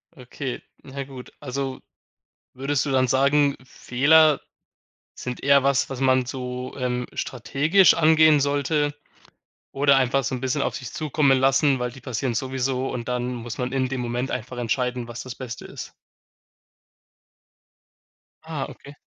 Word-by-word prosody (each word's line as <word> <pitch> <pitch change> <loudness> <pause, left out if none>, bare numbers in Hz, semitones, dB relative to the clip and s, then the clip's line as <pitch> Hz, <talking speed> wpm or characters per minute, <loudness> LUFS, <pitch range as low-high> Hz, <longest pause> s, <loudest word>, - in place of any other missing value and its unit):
Okay, 130 0 -6 0.2
na 140 0 -6
gut. 130 -2 -11
Also 135 -1 -4 0.7
würdest 135 +2 -1
du 140 - -2
dann 130 -1 +3
sagen, 140 +2 +3
Fehler 150 +5 +4 0.8
sind 125 -1 -6
eher 140 -1 +5
was, 140 -1 +2
was 135 -2 -5
man 130 -1 +3
so, 125 0 -5
ähm, 125 -1 -2
strategisch 145 - +3
angehen 155 -2 +5
sollte 145 +1 0 0.8
oder 140 0 +4
einfach 135 +1 +2
so 130 - -2
'n 125 - -6
bisschen 130 +2 0
auf - - -1
sich 125 -5 -7
zukommen 150 -3 +2
lassen, 135 +1 +3
weil 125 0 -2
die 135 +2 -13
passieren 125 0 -2
sowieso 130 +1 -1
und 120 -1 -5
dann 125 0 -2
muss 120 0 -7
man 125 -1 -2
in 130 -1 0
dem 130 -1 -3
Moment 120 +2 -2
einfach 125 +2 -5
entscheiden, 125 0 -1
was 120 0 -7
das 130 -1 -8
Beste 125 -2 -7
ist? - - -9 2.5
Ah, 155 -4 -4
okay. 140 +1 -13
130 Hz, 150 wpm, -24 LUFS, 125-140 Hz, 2.5 s, eher